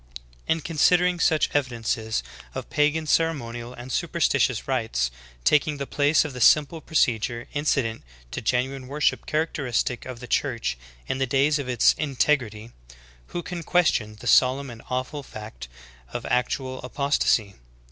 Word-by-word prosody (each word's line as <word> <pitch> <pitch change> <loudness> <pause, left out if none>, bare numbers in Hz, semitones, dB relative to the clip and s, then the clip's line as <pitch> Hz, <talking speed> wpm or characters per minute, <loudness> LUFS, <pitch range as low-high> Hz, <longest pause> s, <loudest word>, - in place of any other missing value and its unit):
'^ - - -30 0.5
8. - - +3
In 160 - -5
considering 175 +3 +3
such 160 -1 +2
evidences 115 -5 -1 0.3
of - - -6
pagan 150 +2 +2
ceremonial 120 -7 0
and 125 +1 -9
superstitious - - +1
rites - - 0 0.3
taking 150 - +3
the 140 - -3
place 145 +3 +2
of 150 - -5
the 125 - -6
simple 155 +6 +4
pro 160 - -12
cedure 120 -3 +1
incident 140 -6 0 0.3
to - - -4
genuine 130 +3 -1
worship 145 +2 0
characteristic 140 -6 -1
of 125 -2 -7
the 125 - -8
Church 120 - -1 0.3
in 130 - -2
the 135 - +1
days 140 +3 +2
of 135 -3 -4
its 120 -3 +4
integrity, 125 -6 0 0.6
who 175 - -5
can 175 0 -5
question 150 -11 +1
the - - -11
solemn 130 +1 +4
and 115 -1 -11
awful 130 +3 -3
fact 105 - -9 0.4
of - - -5
actual 130 +1 -1
apostasy? 125 -6 +1
130 Hz, 150 wpm, -25 LUFS, 120-150 Hz, 0.6 s, simple